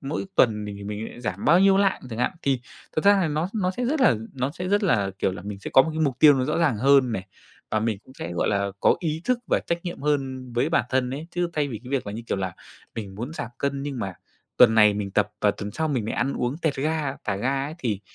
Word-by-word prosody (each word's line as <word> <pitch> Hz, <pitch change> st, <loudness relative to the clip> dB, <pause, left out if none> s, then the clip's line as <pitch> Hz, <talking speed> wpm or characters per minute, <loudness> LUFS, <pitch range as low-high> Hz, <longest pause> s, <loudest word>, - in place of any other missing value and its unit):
mỗi 145 Hz, +7 st, -4 dB
tuần 105 Hz, -4 st, +3 dB
mình 105 Hz, -1 st, -6 dB
thì 100 Hz, -, -9 dB
mình 105 Hz, +2 st, -4 dB
ấy -, -, -12 dB
giảm 95 Hz, -4 st, -4 dB
bao 170 Hz, +4 st, +6 dB
nhiêu 195 Hz, 0 st, +5 dB
lạng 195 Hz, -1 st, +2 dB
chẳng 110 Hz, -, -5 dB
hạn. -, -, +1 dB
Thì 135 Hz, -3 st, +1 dB, 0.4 s
thật 155 Hz, -, 0 dB
ra 200 Hz, 0 st, +6 dB
là 175 Hz, -, +1 dB
nó 155 Hz, +4 st, -1 dB
nó 190 Hz, -4 st, +1 dB
sẽ 245 Hz, +7 st, -3 dB
rất 285 Hz, +5 st, 0 dB
là 225 Hz, -, +5 dB, 0.2 s
nó 130 Hz, +1 st, -1 dB
sẽ 180 Hz, +4 st, -5 dB
rất 205 Hz, +2 st, +2 dB
là, 100 Hz, -, +2 dB
kiểu, 95 Hz, -, +1 dB
là 90 Hz, -, -8 dB
mình 100 Hz, 0 st, -6 dB
sẽ 100 Hz, -, -7 dB
có 135 Hz, -, +9 dB
một 160 Hz, -, -3 dB
cái 160 Hz, -, -3 dB
mục 140 Hz, -5 st, +1 dB
tiêu 150 Hz, -2 st, +8 dB
nó 130 Hz, -1 st, 0 dB
rõ 150 Hz, -, -1 dB
ràng 155 Hz, -9 st, +2 dB
hơn 135 Hz, +1 st, +4 dB
này 95 Hz, -3 st, -4 dB, 0.4 s
và 110 Hz, -, +1 dB
mình 110 Hz, -2 st, -1 dB
cũng 130 Hz, -, -17 dB
sẽ, 85 Hz, -, -6 dB
gọi 85 Hz, -, 0 dB
là, 100 Hz, -1 st, 0 dB
có -, -, +4 dB
ý 160 Hz, -2 st, -2 dB
thức 250 Hz, -1 st, +1 dB
và -, -, +2 dB
trách 170 Hz, 0 st, -2 dB
nhiệm 175 Hz, -5 st, -6 dB
hơn 135 Hz, -4 st, -1 dB
với 120 Hz, +6 st, +1 dB
bản 160 Hz, -, +2 dB
thân 130 Hz, -1 st, +1 dB
ấy. 145 Hz, +5 st, -5 dB
Chứ 175 Hz, 0 st, -1 dB
thay 150 Hz, -3 st, 0 dB
vì 115 Hz, -, -5 dB
cái 125 Hz, -, -9 dB
việc 135 Hz, -6 st, -1 dB
là, 100 Hz, -, -4 dB
như 115 Hz, -, -6 dB
kiểu -, -, 0 dB
là, 95 Hz, -2 st, -3 dB, 0.4 s
mình 100 Hz, -4 st, -6 dB
muốn 120 Hz, +9 st, -5 dB
giảm 120 Hz, -, -5 dB
cân 140 Hz, 0 st, -1 dB
nhưng 140 Hz, -2 st, -4 dB
mà 95 Hz, -5 st, -4 dB, 0.4 s
tuần 115 Hz, -3 st, +7 dB
này 105 Hz, -2 st, +6 dB
mình 100 Hz, -1 st, -3 dB
tập 105 Hz, +1 st, +1 dB
và 105 Hz, -, +4 dB
tuần 105 Hz, 0 st, -6 dB
sau 160 Hz, +9 st, -2 dB
mình 130 Hz, -7 st, -1 dB
lại -, -, -2 dB
ăn 135 Hz, +3 st, 0 dB
uống 125 Hz, +5 st, -2 dB
tẹt 160 Hz, -4 st, -1 dB
ga, 150 Hz, -1 st, -1 dB
thả 100 Hz, -2 st, -1 dB
ga 135 Hz, +5 st, 0 dB
ấy 150 Hz, +3 st, -6 dB
thì 110 Hz, -, -2 dB
130 Hz, 290 wpm, -25 LUFS, 105-155 Hz, 0.4 s, có